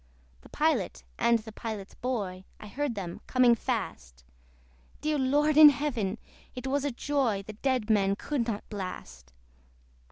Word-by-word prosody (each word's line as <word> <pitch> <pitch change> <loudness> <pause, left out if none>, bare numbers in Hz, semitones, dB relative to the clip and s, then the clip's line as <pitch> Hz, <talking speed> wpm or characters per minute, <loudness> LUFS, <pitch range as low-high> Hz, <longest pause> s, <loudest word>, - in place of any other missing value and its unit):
The - - -16
Pilot, 300 - 0 0.2
and 235 0 +4
the 220 0 -10
Pilot's 215 -3 -6
boy, 200 -8 -3 0.2
I - - -10
heard 260 +4 -3
them 180 -4 -6
coming 250 -2 +5
fast: 65 - -4 0.8
Dear 300 0 0
Lord 295 +3 +2
in 305 -1 +11
Heaven! 245 -9 -1 0.4
it 250 0 -6
was 275 +1 0
a 290 - 0
joy 245 -6 0
The 215 - -9
dead 250 0 -1
men 200 -3 +3
could 255 +1 -2
not 210 -3 -4
blast. 70 - -7
235 Hz, 150 wpm, -29 LUFS, 200-275 Hz, 0.8 s, in